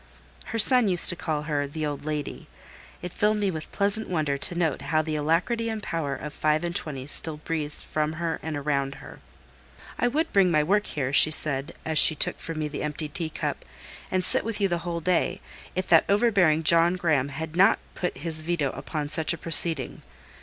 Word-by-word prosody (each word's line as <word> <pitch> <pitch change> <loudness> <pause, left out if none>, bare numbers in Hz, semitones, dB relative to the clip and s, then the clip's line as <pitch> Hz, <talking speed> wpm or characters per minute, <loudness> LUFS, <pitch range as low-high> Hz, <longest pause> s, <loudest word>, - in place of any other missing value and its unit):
Her 230 - -5
son 245 +1 +5
used 180 -3 +4
to 175 - 0
call 155 -3 -3
her 145 -2 -2
"the 155 +2 -5
old 145 -1 -5
lady;" 150 -2 -5 0.6
it 180 - -5
filled 210 +1 +1
me 200 -2 -1
with 160 -3 -8
pleasant 205 +2 -1
wonder 155 -5 -1
to 140 +5 +1
note 165 -5 -1
how 155 +3 0
the 155 0 -4
alacrity 170 +10 -1
and 220 -2 -5
power 150 -5 -3
of 150 +2 -8
five 155 +1 0
and 175 0 -4
twenty 135 -4 -5
still 155 +2 -1
breathed 150 -1 -5
from 155 0 -3
her 165 0 -4
and 160 -2 -5
around 140 -1 -2
her. - - -13 0.8
"I 245 - +2
would 310 +6 -2
bring 195 -2 +4
my 155 -3 +2
work 205 +6 0
here," 135 -2 -4
she 155 - +7
said, 145 -1 +3
as 160 -2 +3
she 155 - +9
took - - 0
from 165 -1 -6
me 155 -1 -2
the 145 -1 -6
emptied 150 0 -4
teacup, 160 -3 -4 0.5
"and 185 -1 -1
sit - - +4
with 225 0 -4
you 200 - +2
the 175 -2 -2
whole 170 0 -5
day, 180 +2 0 0.4
if 185 +1 -2
that 165 - +5
overbearing 200 -7 +2
John 170 +2 +4
Graham 155 -7 0
had 160 +3 -7
not 195 +5 +4 0.2
put 180 - -4
his 160 -2 -4
veto 155 -4 -2
upon 150 -2 -5
such 160 +2 0
a - - -6
proceeding. 160 -3 +2
160 Hz, 205 wpm, -25 LUFS, 150-180 Hz, 0.8 s, she